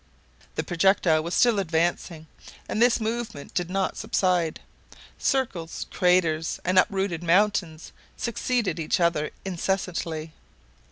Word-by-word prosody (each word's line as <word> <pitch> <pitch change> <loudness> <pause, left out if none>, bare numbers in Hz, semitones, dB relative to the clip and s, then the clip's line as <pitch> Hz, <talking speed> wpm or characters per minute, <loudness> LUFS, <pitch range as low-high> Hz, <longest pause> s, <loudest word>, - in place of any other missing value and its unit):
The - - -1
projectile 175 -3 +3
was 170 +3 -3
still 235 -4 +4
advancing, 165 -2 -1 0.4
and 215 - -2
this 245 0 +4
movement 225 -8 -4
did 175 -1 -1
not 190 0 -1
subside. 180 -7 0 0.6
Circles, 195 - -1
craters, 175 -4 +2
and 185 +1 +4
uprooted 190 -4 0
mountains 175 -2 +1 0.3
succeeded 235 -4 -1
each 160 - 0
other 170 -3 +1 0.2
incessantly. 170 -4 -2
180 Hz, 110 wpm, -25 LUFS, 165-200 Hz, 0.6 s, still